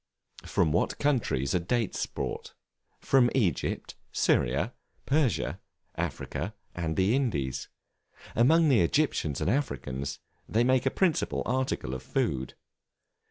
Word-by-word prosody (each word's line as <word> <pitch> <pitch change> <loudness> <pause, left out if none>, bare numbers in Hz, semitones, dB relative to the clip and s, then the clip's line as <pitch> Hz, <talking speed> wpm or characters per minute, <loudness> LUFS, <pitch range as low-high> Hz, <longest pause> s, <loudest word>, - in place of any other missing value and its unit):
From 80 - +2
what 85 - +1
countries 115 - +1
are 90 - +3
Dates 115 +5 -1
brought? - - -5 0.5
From 130 -3 +4
Egypt, 95 - 0 0.2
Syria, 70 - +1 0.3
Persia, 140 -4 +1 0.3
Africa, 105 +5 -4 0.2
and 80 -2 -3
the 95 +5 +3
Indies. 75 - -1 0.7
Among 160 +8 +5
the 130 -6 +5
Egyptians 85 - +1
and - - 0
Africans, 70 - -2 0.3
they 115 +2 +3
make 130 +1 +3
a - - +5
principal 175 +1 +1
article 130 - -1
of 65 - -4
food. 65 -1 -1
110 Hz, 115 wpm, -29 LUFS, -, 0.7 s, Among